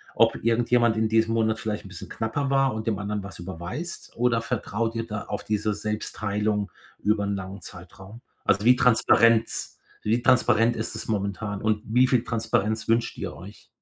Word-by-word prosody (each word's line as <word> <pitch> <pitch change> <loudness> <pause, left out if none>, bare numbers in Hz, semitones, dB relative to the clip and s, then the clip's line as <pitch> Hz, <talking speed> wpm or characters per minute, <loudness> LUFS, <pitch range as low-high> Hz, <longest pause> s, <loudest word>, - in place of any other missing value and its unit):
ob - - +4
irgendjemand 120 0 +3
in 110 0 +1
diesem 115 0 +2
Monat 110 -1 +1
vielleicht 105 -1 -3
'n - - -10
bisschen 90 -3 -9
knapper 135 +5 -2
war 135 -3 +2
und 110 +1 -5
dem 105 -3 0
anderen 105 0 -3
was 95 -3 -10
überweist, 95 - -6
oder 120 -1 +2
vertraut 115 -1 -2
ihr 115 0 -2
da 105 -1 -4
auf 105 - -5
diese 105 0 -1
Selbstteilung 105 -1 -2 0.3
über 105 0 +1
'n 100 0 -1
langen 95 0 -7
Zeitraum? 95 +7 -12 0.2
Also, 100 +2 +2
wie 125 - +7
Transparenz 115 -2 +3 0.3
wie 115 +3 +1
transparent 120 -2 +3
ist 110 0 -3
es 110 - -6
momentan 100 0 -2
und 110 -1 +1
wie 125 +4 +3
viel 125 -2 +2
Transparenz 110 -1 -1
wünscht 115 +1 +1
ihr - - -5
euch? 95 +5 -12
110 Hz, 180 wpm, -25 LUFS, 105-115 Hz, 0.3 s, wie